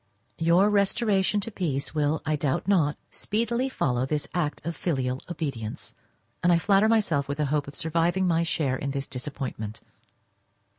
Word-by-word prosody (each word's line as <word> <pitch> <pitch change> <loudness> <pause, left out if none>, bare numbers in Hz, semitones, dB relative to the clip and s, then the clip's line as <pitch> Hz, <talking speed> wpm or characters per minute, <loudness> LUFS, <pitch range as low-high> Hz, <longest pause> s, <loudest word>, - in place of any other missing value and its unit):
Your 175 +5 +4
restoration 205 0 +2
to 230 - -5
peace 145 -10 -2
will, 150 0 0
I 155 0 +1
doubt 140 +1 -1
not, 160 -7 +3
speedily 235 +4 -1
follow 125 - 0
this 145 +2 -1
act 160 -5 -1
of 170 0 -2
filial 130 -6 -1
obedience, 135 -10 -5 0.5
and 175 - +4
I 170 - +6
flatter 200 +4 +4
myself 170 -11 +2
with 140 +1 -3
the 150 - +1
hope 145 -2 0
of 145 - -9
surviving 170 +3 +1
my 170 -2 +2
share 155 -6 0
in 140 - -3
this 140 0 -3
disappointment. 125 -5 -5
160 Hz, 160 wpm, -26 LUFS, 140-190 Hz, 0.5 s, I